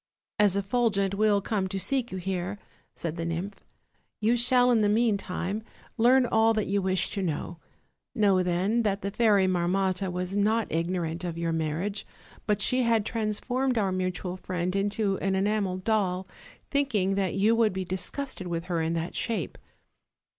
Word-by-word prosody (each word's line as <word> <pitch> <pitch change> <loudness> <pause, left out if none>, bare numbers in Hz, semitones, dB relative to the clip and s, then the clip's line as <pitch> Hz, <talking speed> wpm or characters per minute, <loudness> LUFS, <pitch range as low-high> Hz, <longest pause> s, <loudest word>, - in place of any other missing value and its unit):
"As 205 -2 +4
Effulgent 200 -1 +1
will 205 0 +3
come 195 -2 -1
to 195 +1 -4
seek 245 +6 -1
you 190 - -4
here," 185 +1 -3 0.4
said 165 0 -4
the 165 - -3
nymph, 170 +4 -4 0.6
"you 225 +3 +3
shall 245 +1 +4
in 235 - +4
the 210 -1 +3
meantime 210 -2 0 0.3
learn 250 +2 +5
all 225 -1 +3
that 215 - 0
you 200 +1 0
wish 185 0 0
to 200 - -2
know. 170 0 -3 0.6
Know, 200 -5 +3
then, 185 +6 +1
that 200 -3 -1
the 200 - -2
Fairy 210 -3 +3
Marmotta 185 +1 0
was 180 +2 -3
not 215 +2 +1
ignorant 170 0 -2
of 170 -2 -4
your 170 0 -1
marriage; 165 +6 -2 0.4
but 210 0 +1
she 255 +5 +3
had 230 -3 +2
transformed 240 +4 -1
our 200 -3 +1
mutual 185 0 -2
friend 180 0 -3
into 200 0 0
an 190 0 0
enamel 195 -1 0
doll, 190 -2 0 0.4
thinkingthat 200 - 0
you 210 +3 +4
would 225 -4 +2
tpe 190 -1 -3
disgusted 190 +3 -3
with 170 -1 -3
her 175 -2 -1
in 160 +1 0
that 165 0 -3
shape. 230 -2 -2
195 Hz, 165 wpm, -27 LUFS, 180-220 Hz, 0.6 s, learn